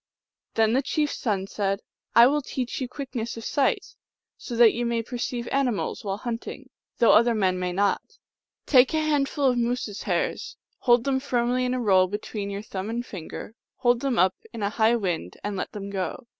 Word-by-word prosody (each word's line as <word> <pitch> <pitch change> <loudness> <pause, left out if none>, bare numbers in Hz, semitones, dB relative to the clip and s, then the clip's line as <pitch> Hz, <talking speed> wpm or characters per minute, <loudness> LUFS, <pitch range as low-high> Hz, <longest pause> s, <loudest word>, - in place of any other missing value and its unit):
Then 220 0 +3
the 265 - +3
chief 295 +2 0
s - - -6
son 200 -5 -1
said, 195 0 -1 0.2
" - - -42
I 235 - +9
will 295 +4 +3
teach 260 -1 -4
you 255 - -1
quick 270 +2 -8
ness 230 -2 -3
of 225 - -7
sight, 280 -3 0 0.4
so 240 - -7
that 230 -1 +6
you 240 - -2
may 235 -1 0
perceive 240 0 -4
animals 260 -6 0
while 195 -1 -2
hunting, 240 +4 -6 0.3
though 235 - +5
other 235 +2 +5
men 185 -3 +1
may 180 0 -1
not. 200 +3 -1 0.5
Take 260 +1 +5
a - - +3
hand 295 -3 +1
ful 285 - -1
of 250 -2 +3
moose 240 +1 0
s 205 -1 -7
hairs; 455 -2 -2 0.2
hold 240 -2 +4
them 270 0 +1
firmly 250 -1 0
in 250 0 0
a - - -1
roll 190 -5 +4
be 205 +3 -2
tween 205 -1 -5
your 200 +1 -5
thumb 195 -1 -5
and 240 +2 -3
finger; 190 +2 -8 0.2
hold 240 -1 +2
them 265 -2 -1
up 185 +1 +4 0.2
in 230 -3 -5
a 200 - 0
high 225 +2 +3
wind 175 - -3
and 205 -1 -3
let 185 - -4
them 200 -1 -6
go. 195 +6 -4
235 Hz, 215 wpm, -25 LUFS, 205-255 Hz, 0.5 s, I